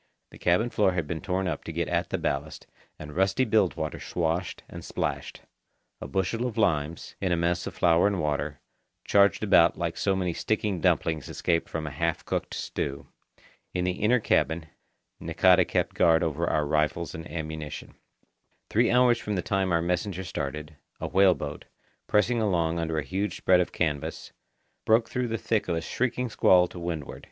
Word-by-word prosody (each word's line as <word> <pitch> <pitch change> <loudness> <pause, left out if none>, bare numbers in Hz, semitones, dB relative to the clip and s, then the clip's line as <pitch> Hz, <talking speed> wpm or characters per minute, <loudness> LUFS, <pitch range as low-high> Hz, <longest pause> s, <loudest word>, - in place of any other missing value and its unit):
The - - -14
cabin 100 +8 +2
floor 95 -3 +2
had 85 -3 -1
been 80 +1 -4
torn 95 0 -1
up - - -3
to - - -5
get - - -2
at - - -1
the - - -1
ballast, 70 +3 -3 0.3
and 75 -1 -9
rusty 95 +7 +2
bilge 105 -5 +2
water 80 -2 -4
swashed 85 +1 -2
and - - -9
splashed. - - -4 0.6
A - - -5
bushel 95 - -1
of 115 - -6
limes, 80 -6 0
in 95 -2 0
a 85 - +2
mess 85 +1 0
of - - -7
flour 85 +2 +4
and 100 -3 -1
water, 75 -2 -2 0.4
charged 100 +1 +4
about 85 -5 +5
like 85 -1 -3
so 95 -1 +1
many 90 -2 -1
sticky 105 +2 -1
dumplings 80 -2 +1
escaped 85 -2 -1
from 80 -1 -4
a 75 - -4
half 65 - -2
cooked - - -3
stew. 70 0 -4 0.7
In 90 - 0
the 90 - +1
inner 110 +7 +2
cabin, 80 -6 +1 0.6
Nakata 90 +2 +4
kept - - 0
guard 80 -1 +4
over 80 +1 -1
our 75 -1 +1
rifles 75 +3 0
and 80 +1 -8
ammunition. 80 -2 -6 0.8
Three 115 +2 +3
hours 125 -1 +4
from 105 -2 -3
the 90 - -1
time 95 -2 0
our 85 -1 +2
messenger 90 +2 -2
started, 75 -2 -5 0.2
a - - -3
whale 95 -1 +4
boat, 75 +1 -6 0.4
pressing 115 +3 +2
along 85 -5 +1
under 80 -1 -2
a 75 - 0
huge 95 +8 -3
spread 90 -1 +4
of 90 - 0
canvas, 80 -1 -3 0.5
broke 110 +1 +3
through 125 -1 -1
the 115 0 -2
thick 110 -1 -1
of 85 - 0
a 80 - -1
shrieking 125 +6 -2
squall 90 -3 +5
to 90 - -9
windward. 85 -4 -5
90 Hz, 185 wpm, -27 LUFS, 80-100 Hz, 0.8 s, about